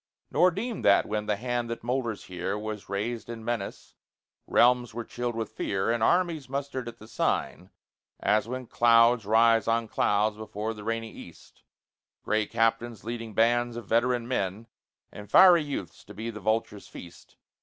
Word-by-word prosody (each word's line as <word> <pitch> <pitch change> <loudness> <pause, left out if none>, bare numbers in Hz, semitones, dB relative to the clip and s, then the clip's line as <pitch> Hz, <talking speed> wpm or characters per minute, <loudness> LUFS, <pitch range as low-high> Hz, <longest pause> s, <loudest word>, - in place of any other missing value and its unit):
Nor 180 - +5
deem 220 +5 -4
that 100 - +4
when 105 0 -3
the 105 - +1
hand 120 +1 -3
that 115 - -5
molders 120 -3 -2
here 95 +2 -4
Was 105 -2 -6
raised 110 +4 -3
in 115 -1 -7
menace, 115 -4 -4 0.5
realms 120 -1 +3
were 120 - -3
chilled 120 0 -4
with 115 -1 -4
fear, 95 +3 -1
And 120 -1 -1
armies 165 0 +1
mustered 135 -2 -4
at 120 - -8
the 110 - -14
sign, 90 -4 -2 0.5
as 110 +1 +1
when 130 +1 -5
Clouds 115 -1 +4
rise 115 0 +4
on 115 0 +1
clouds 105 0 +1
before 110 0 -4
the 105 -1 -10
rainy 115 0 -3
East - - -14 0.6
Gray 110 -1 0
captains 115 0 0
leading 115 -1 -6
bands 120 +1 +2
of 120 - -7
veteran 120 +2 +1
men 105 -3 -2 0.5
And 105 0 -11
fiery 180 -3 +7
youths 100 - -6
to - - -12
be 115 +2 -5
the 105 - -9
vulture's 110 -1 -2
feast. 85 0 -13
115 Hz, 165 wpm, -27 LUFS, 105-120 Hz, 0.6 s, fiery